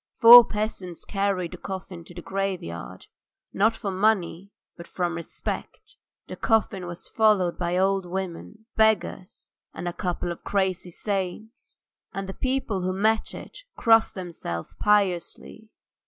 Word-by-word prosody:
Four 240 Hz, 0 st, +11 dB
peasants 210 Hz, -5 st, -4 dB
carried 195 Hz, -4 st, -1 dB
the -, -, -8 dB
coffin 185 Hz, -3 st, -7 dB
to 175 Hz, -, -13 dB
the 175 Hz, -, -8 dB
graveyard, 190 Hz, -, -4 dB, 0.5 s
not 220 Hz, +3 st, +3 dB
for 210 Hz, -3 st, -4 dB
money, 190 Hz, -2 st, 0 dB, 0.3 s
but 170 Hz, -, -11 dB
from 175 Hz, -2 st, -2 dB
respect. 170 Hz, -1 st, -6 dB, 0.3 s
The -, -, -7 dB
coffin 210 Hz, -5 st, 0 dB
was 175 Hz, 0 st, -9 dB
followed 210 Hz, -6 st, +2 dB
by 175 Hz, 0 st, 0 dB
old 190 Hz, 0 st, +1 dB
women, 190 Hz, +4 st, -6 dB
beggars, 220 Hz, -2 st, 0 dB, 0.2 s
and 175 Hz, -, -5 dB
a 175 Hz, -, -2 dB
couple 180 Hz, -2 st, -3 dB
of 170 Hz, -, -8 dB
crazy 190 Hz, -2 st, -1 dB
saints, 200 Hz, +4 st, -5 dB, 0.3 s
and 195 Hz, 0 st, -4 dB
the 190 Hz, -, -5 dB
people 255 Hz, -7 st, -2 dB
who 185 Hz, +1 st, -1 dB
met 220 Hz, +3 st, +1 dB
it -, -, -10 dB, 0.2 s
crossed 225 Hz, -1 st, +4 dB
themselves 170 Hz, -, -6 dB
piously. 205 Hz, +1 st, 0 dB
190 Hz, 140 wpm, -25 LUFS, 175-215 Hz, 0.5 s, Four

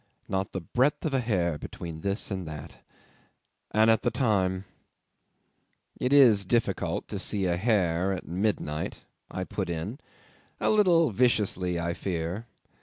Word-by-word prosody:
"Not 95 Hz, -1 st, -2 dB
the 95 Hz, -, -4 dB
breadth 130 Hz, -, +1 dB
of 155 Hz, -, -1 dB
a 135 Hz, -, +3 dB
hair 90 Hz, -10 st, 0 dB
between 80 Hz, -2 st, -7 dB
this 100 Hz, +3 st, -2 dB
and 95 Hz, -3 st, -3 dB
that. 75 Hz, 0 st, -8 dB, 0.9 s
And 110 Hz, +1 st, +4 dB
at 110 Hz, 0 st, +3 dB
the 120 Hz, -, +1 dB
time.. 95 Hz, -7 st, +1 dB, 0.5 s
." -, -, -47 dB
'"It 125 Hz, -, +1 dB
is 120 Hz, -8 st, +7 dB
difficult 115 Hz, +4 st, 0 dB
to -, -, -4 dB
see 100 Hz, -2 st, 0 dB
a 90 Hz, -1 st, +2 dB
hair 95 Hz, -3 st, +1 dB
at 95 Hz, -, -4 dB
midnight," 85 Hz, -5 st, -2 dB, 0.2 s
I -, -, -3 dB
put -, -, -4 dB
in, 85 Hz, -, -4 dB, 0.6 s
a -, -, +2 dB
little 175 Hz, -, +4 dB
viciously 95 Hz, -6 st, +1 dB
I 85 Hz, 0 st, -1 dB
fear. 90 Hz, +5 st, -3 dB
95 Hz, 150 wpm, -28 LUFS, 85-120 Hz, 0.9 s, is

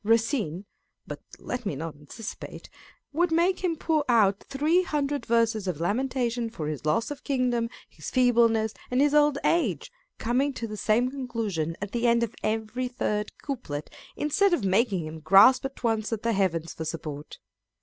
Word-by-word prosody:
Racine 220 Hz, -, +1 dB, 0.4 s
(but -, -, -7 dB, 0.2 s
let 250 Hz, 0 st, -5 dB
me 200 Hz, -9 st, -2 dB
not 160 Hz, +3 st, -5 dB
anticipate) 150 Hz, +10 st, -9 dB, 0.4 s
would 345 Hz, +3 st, +2 dB
make 350 Hz, +3 st, +2 dB
him 345 Hz, -3 st, +1 dB
pour 315 Hz, -1 st, 0 dB
out 205 Hz, -4 st, +3 dB
three 305 Hz, +6 st, +2 dB
hundred 290 Hz, -4 st, -2 dB
verses 225 Hz, -3 st, +2 dB
of 170 Hz, -5 st, -2 dB
lamentation 240 Hz, +4 st, -1 dB
for 170 Hz, -9 st, -6 dB
his 155 Hz, 0 st, -4 dB
loss 225 Hz, -, +1 dB
of 290 Hz, -, -7 dB
king 255 Hz, -3 st, +1 dB
dom, 230 Hz, -1 st, 0 dB, 0.2 s
his -, -, -8 dB
feebleness, 230 Hz, -3 st, +3 dB, 0.2 s
and 250 Hz, -, +1 dB
his 290 Hz, +1 st, +4 dB
old 295 Hz, -1 st, +4 dB
age, 235 Hz, -, +1 dB, 0.3 s
coming 260 Hz, +5 st, 0 dB
to 235 Hz, -, -5 dB
the 215 Hz, -1 st, -6 dB
same 230 Hz, +4 st, +1 dB
conclusion 225 Hz, -, -3 dB
at 205 Hz, 0 st, -5 dB
the 240 Hz, 0 st, 0 dB
end 235 Hz, 0 st, +3 dB
of 230 Hz, -1 st, -3 dB
every 220 Hz, +3 st, -2 dB
third 210 Hz, -4 st, -2 dB
couplet, 190 Hz, -, -5 dB, 0.2 s
instead 350 Hz, +6 st, +2 dB
of 255 Hz, -, -5 dB
making 195 Hz, -3 st, +2 dB
him 155 Hz, +1 st, -7 dB
grasp 195 Hz, -, +6 dB
at 270 Hz, -1 st, -7 dB
once 225 Hz, -2 st, 0 dB
at 225 Hz, -1 st, -3 dB
the 230 Hz, 0 st, +1 dB
Heavens 170 Hz, -5 st, 0 dB
for 160 Hz, -, -5 dB
support. 155 Hz, -2 st, -6 dB
230 Hz, 175 wpm, -27 LUFS, 195-270 Hz, 0.4 s, grasp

